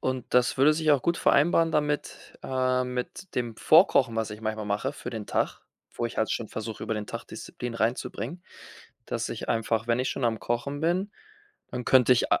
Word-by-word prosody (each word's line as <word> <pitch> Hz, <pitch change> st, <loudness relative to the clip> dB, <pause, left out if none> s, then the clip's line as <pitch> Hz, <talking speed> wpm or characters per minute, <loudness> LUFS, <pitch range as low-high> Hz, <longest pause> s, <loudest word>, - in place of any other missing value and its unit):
und 130 Hz, -1 st, -2 dB
das 125 Hz, +1 st, +3 dB
würde 145 Hz, +3 st, +6 dB
sich 155 Hz, -1 st, +1 dB
auch 140 Hz, -4 st, +4 dB
gut 170 Hz, 0 st, +1 dB
vereinbaren 165 Hz, +3 st, +3 dB
damit 150 Hz, -1 st, -2 dB
äh, 130 Hz, -1 st, +1 dB
mit 125 Hz, +8 st, -5 dB
dem 120 Hz, -2 st, -2 dB
Vorkochen, 135 Hz, -, +5 dB
was 110 Hz, -1 st, -1 dB
ich 105 Hz, -, -8 dB
manchmal 110 Hz, -1 st, -3 dB
mache 105 Hz, +7 st, -1 dB
für -, -, -7 dB
den 110 Hz, -3 st, -6 dB
Tag, -, -, -1 dB, 0.3 s
wo 120 Hz, -, -3 dB
ich -, -, -9 dB
halt 110 Hz, -, 0 dB
schon 115 Hz, -, -2 dB
versuche, 110 Hz, 0 st, -6 dB
über 110 Hz, -, -2 dB
den 105 Hz, -1 st, -4 dB
Tag -, -, -6 dB
Disziplin 120 Hz, -1 st, -7 dB
reinzubringen, 120 Hz, +9 st, -2 dB, 0.6 s
dass -, -, -2 dB
ich -, -, -6 dB
einfach, 115 Hz, 0 st, 0 dB
wenn 120 Hz, +1 st, +2 dB
ich 130 Hz, -, -1 dB
schon 135 Hz, -, -3 dB
am 110 Hz, -3 st, 0 dB
Kochen 120 Hz, +7 st, -2 dB
bin, 185 Hz, +5 st, 0 dB, 0.6 s
dann 125 Hz, 0 st, -4 dB
könnte 130 Hz, 0 st, +6 dB
ich 120 Hz, -, +1 dB
a -, -, +4 dB
125 Hz, 205 wpm, -27 LUFS, 115-145 Hz, 0.6 s, würde